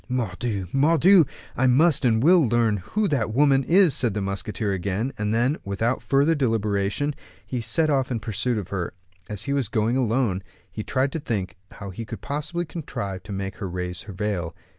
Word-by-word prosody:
"Mordioux! 110 Hz, -4 st, -2 dB
Mordioux! 165 Hz, +5 st, +5 dB, 0.3 s
I 130 Hz, -, +2 dB
must 150 Hz, +5 st, +4 dB
and 115 Hz, -1 st, +3 dB
will 170 Hz, -3 st, +6 dB
learn 115 Hz, -2 st, +2 dB
who 200 Hz, -, -1 dB
that 140 Hz, -7 st, 0 dB
woman 135 Hz, +2 st, +4 dB
is," 175 Hz, 0 st, +4 dB
said 115 Hz, -5 st, +1 dB
the 105 Hz, -, -1 dB
musketeer 100 Hz, +2 st, -3 dB
again; 100 Hz, +7 st, -2 dB
and 105 Hz, -2 st, -2 dB
then, 120 Hz, +7 st, +2 dB
without 110 Hz, +5 st, -1 dB
further 140 Hz, +4 st, +3 dB
deliberation, 110 Hz, 0 st, 0 dB, 0.3 s
he 125 Hz, -2 st, -3 dB
set 150 Hz, +8 st, +1 dB
off 135 Hz, -2 st, +1 dB
in 120 Hz, -3 st, -1 dB
pursuit 115 Hz, +2 st, -1 dB
of 95 Hz, -3 st, -5 dB
her. 95 Hz, -2 st, -3 dB, 0.3 s
As 105 Hz, -2 st, -5 dB
he 140 Hz, -, -1 dB
was 135 Hz, -7 st, 0 dB
going 110 Hz, +1 st, +1 dB
along, 115 Hz, -6 st, +1 dB, 0.3 s
he 110 Hz, -, -5 dB
tried 135 Hz, +3 st, 0 dB
to 165 Hz, -, -3 dB
think 105 Hz, -9 st, -3 dB, 0.2 s
how 100 Hz, -2 st, -8 dB
he 105 Hz, +5 st, -6 dB
could 110 Hz, -, -8 dB
possibly 150 Hz, +5 st, -3 dB
contrive 100 Hz, -, -5 dB
to -, -, -10 dB
make 95 Hz, 0 st, -4 dB
her 95 Hz, -, -4 dB
raise 90 Hz, 0 st, -4 dB
her 100 Hz, 0 st, -9 dB
veil. 95 Hz, -4 st, -3 dB
115 Hz, 190 wpm, -24 LUFS, 100-140 Hz, 0.3 s, will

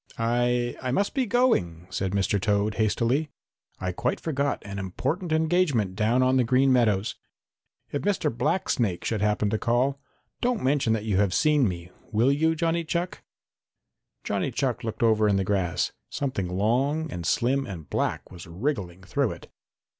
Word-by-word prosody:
"I 120 Hz, +1 st, +1 dB
I 130 Hz, -, -2 dB
must 200 Hz, +11 st, 0 dB
be 260 Hz, -3 st, 0 dB
going," 105 Hz, -, +1 dB
said 95 Hz, 0 st, -2 dB
Mr. 100 Hz, 0 st, +1 dB
Toad 105 Hz, 0 st, +1 dB
hastily. 120 Hz, +8 st, +1 dB, 0.5 s
"I 95 Hz, 0 st, -2 dB
quite 90 Hz, -, -1 dB
forgot 140 Hz, -3 st, -1 dB
an 100 Hz, 0 st, -5 dB
important 130 Hz, -, -3 dB
engagement 155 Hz, -, +2 dB
down 115 Hz, +4 st, +2 dB
on 130 Hz, +1 st, +3 dB
the 130 Hz, -, +4 dB
Green 130 Hz, +3 st, +3 dB
Meadows. 110 Hz, -5 st, +2 dB, 0.7 s
If 145 Hz, -, -2 dB
Mr. 185 Hz, -, 0 dB
Blacksnake 120 Hz, -, 0 dB
should 110 Hz, -3 st, -1 dB
happen 105 Hz, -1 st, +1 dB
to 110 Hz, -, 0 dB
call, 130 Hz, +4 st, +1 dB, 0.4 s
don't 245 Hz, -4 st, 0 dB
mention 135 Hz, -4 st, +2 dB
that 110 Hz, -1 st, -2 dB
you 105 Hz, -4 st, +1 dB
have 100 Hz, -2 st, +2 dB
seen 150 Hz, -5 st, +3 dB
me, 85 Hz, -1 st, -5 dB, 0.2 s
will 115 Hz, +5 st, +3 dB
you, 160 Hz, +3 st, +2 dB
Johnny 165 Hz, +1 st, 0 dB
Chuck?" 170 Hz, +3 st, -3 dB, 1.0 s
Johnny -, -, -1 dB
Chuck -, -, -1 dB
looked 115 Hz, 0 st, -3 dB
over 110 Hz, -2 st, +4 dB
in 100 Hz, -, +3 dB
the 95 Hz, -, +1 dB
grass. 95 Hz, -3 st, 0 dB, 0.2 s
Something 130 Hz, -10 st, -2 dB
long 130 Hz, -, 0 dB
and 85 Hz, -, -5 dB
slim 130 Hz, +10 st, +1 dB
and 85 Hz, -6 st, -7 dB
black -, -, -2 dB
was 85 Hz, -3 st, -10 dB
wriggling 95 Hz, -, -3 dB
through 135 Hz, +5 st, 0 dB
it. -, -, -14 dB
120 Hz, 165 wpm, -26 LUFS, 100-145 Hz, 1.0 s, the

